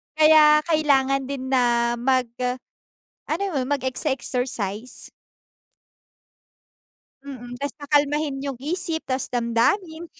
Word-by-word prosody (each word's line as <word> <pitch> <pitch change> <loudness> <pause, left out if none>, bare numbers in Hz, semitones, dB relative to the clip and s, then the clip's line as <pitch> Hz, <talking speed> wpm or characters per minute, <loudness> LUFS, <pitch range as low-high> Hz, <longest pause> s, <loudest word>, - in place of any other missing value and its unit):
Kaya 305 -1 +6
kailangan 275 -4 +1
din 265 -1 -5
na 240 -2 +2
mag 255 -1 +1
ah, 250 0 -1 0.8
ano 325 +5 -1
mem, 255 - 0
mag-exe-exercise. 255 -5 -3 2.2
Mm, 245 -3 -8
tas 285 - -3
pakalmahin 290 0 0
yung 275 -3 -4
isip, 330 +2 -2
tas 260 0 -1
damdamin. 315 - 0
270 Hz, 95 wpm, -23 LUFS, 250-300 Hz, 2.2 s, Kaya